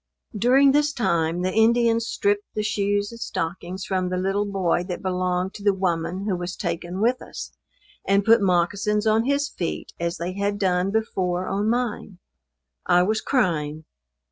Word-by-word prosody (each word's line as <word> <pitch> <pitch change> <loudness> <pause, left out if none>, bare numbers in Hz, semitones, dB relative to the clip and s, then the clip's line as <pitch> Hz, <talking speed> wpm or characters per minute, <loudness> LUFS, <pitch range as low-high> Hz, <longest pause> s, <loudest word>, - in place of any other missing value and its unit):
During 260 +6 +5
this 295 +1 +2
time, 170 - 0
the 185 0 -1
Indians 230 +1 +3
stripped 205 -1 -1
the 215 - -1
shoes 205 0 0
and 230 0 -11
stockings 180 +3 -4
from 185 -2 -1
the 185 - -2
little 195 +2 0
boy 185 -3 0
that 180 +1 -5
belonged 185 0 -1
to 205 - -10
the 200 -1 +3
woman 185 0 -1
who 200 -3 0
was 180 +1 -4
taken 175 +1 -4
with 245 +3 +2
us, - - -8 0.5
and 200 0 +2
put 230 0 +6
moccasins 200 +3 +1
on 220 +1 +3
his 280 +1 +1
feet, 170 -10 -5
as 170 +1 -2
they 175 +2 -4
had 200 +1 -1
done 185 -1 +1
before 185 -4 -1
on 205 +2 0
mine. 230 -5 -2 0.7
I 175 0 +4
was 215 +3 0
crying. 160 - 0
195 Hz, 170 wpm, -24 LUFS, 180-220 Hz, 0.7 s, put